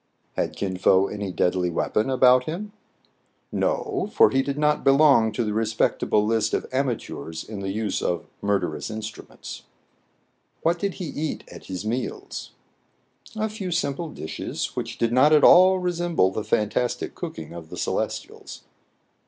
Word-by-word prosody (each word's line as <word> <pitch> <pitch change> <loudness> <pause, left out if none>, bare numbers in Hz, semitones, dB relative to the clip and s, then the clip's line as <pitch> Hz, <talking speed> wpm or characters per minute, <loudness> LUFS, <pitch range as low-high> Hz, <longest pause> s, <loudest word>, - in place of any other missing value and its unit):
Had - - -2
Kin 95 -2 -3
Fo 95 +1 +4
any 100 -1 -4
deadly 90 0 +1
weapon 105 +7 0
about 125 -1 +5
him 200 +6 -5 0.4
} - - -30
No^ 380 - -1
for - - +5
he 135 - +3
did 140 +1 -3
not 150 0 +2
belong 135 -5 +5
to 120 - 0
the 105 -1 -2
respectable 110 -1 +1
list 110 0 +1
of - - -2
amateurs 120 -11 -3
in 105 -2 -7
the 95 0 -3
use 105 +1 -2
of 85 -3 -1 0.2
murderous 100 +2 -1
instru 110 0 -7
ments. - - -9 1.0
What 170 +1 +2
did 200 0 -2
he 180 - -5
eat 155 0 -4
at - - -11
His 95 +2 -5
meals 120 +3 -4 0.4
} - - -44
A 215 0 0
few 210 -3 -5
simple 165 -1 -1
dishes, 80 - -5
which - - -4
did 115 0 0
not 140 +5 +5
at 150 - +5
all 185 +1 +7
resem 175 -1 -2
ble 95 -7 +4
the 105 - -3
fantastic 110 +3 -1
cooking 80 0 -7
of 85 -2 -9
the - - -8
Celestials. - - -4
120 Hz, 165 wpm, -24 LUFS, 105-155 Hz, 1.0 s, all